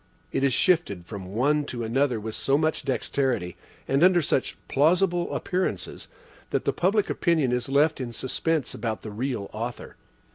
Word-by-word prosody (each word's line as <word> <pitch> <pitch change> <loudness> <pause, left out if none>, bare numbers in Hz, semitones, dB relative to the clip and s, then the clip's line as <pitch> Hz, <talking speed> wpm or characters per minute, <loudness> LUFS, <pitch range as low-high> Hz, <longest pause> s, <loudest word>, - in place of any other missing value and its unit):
It - - 0
is 140 - +4
shifted 130 - +2
from 95 -1 -7
one 140 +9 +1
to 120 -4 -4
another 125 +1 +1
with 110 +1 -5
so 135 +5 +1
much 155 +1 +1
dexterity, 130 - -1 0.3
and 135 +4 +2
under 180 -1 +6
such 145 -4 0
plausible 175 +4 +2
appearances, 185 0 -2 0.4
that - - -1
the - - +2
public 200 +3 +2
opinion 160 -8 +1
is 125 +1 -1
left 145 +2 +3
in 120 -2 -4
suspense 135 +4 -2
about 110 -1 -3
the 110 - -6
real 115 -2 -3
author. 115 +3 -6
135 Hz, 160 wpm, -26 LUFS, 115-160 Hz, 0.4 s, under